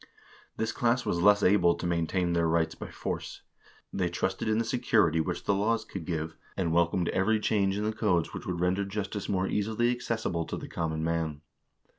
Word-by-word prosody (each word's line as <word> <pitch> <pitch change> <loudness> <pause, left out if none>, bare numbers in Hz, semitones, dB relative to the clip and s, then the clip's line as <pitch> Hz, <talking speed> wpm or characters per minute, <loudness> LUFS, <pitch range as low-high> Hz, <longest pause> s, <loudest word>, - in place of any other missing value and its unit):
This 110 0 -1
class 120 +1 +1
was 85 - 0
less 105 +2 +5
able 90 -3 +4
to 85 - -6
maintain 85 +1 0
their 85 -1 +2
rights 80 0 +1
by - - -8
force. - - -5 0.5
They 90 -2 0
trusted 95 +4 -2
in 110 0 +2
the 115 - +1
security 110 -9 +2
which 85 +2 -3
the 100 - +2
laws 110 +3 +1
could 95 -5 -7
give, 80 -2 -3 0.2
and 85 -4 0
welcomed 85 +1 +2
every 110 +4 +2
change 100 -2 +1
in 105 - -1
the 110 +1 0
codes 100 -7 +1
which - - -7
would 90 -2 -2
render 90 +3 +1
justice 100 0 -4
more 95 -1 +1
easily 110 +3 +1
accessible 110 -8 -2
to - - -4
the - - -7
common 80 -1 -2
man. 80 -2 -1
95 Hz, 195 wpm, -29 LUFS, 85-105 Hz, 0.5 s, less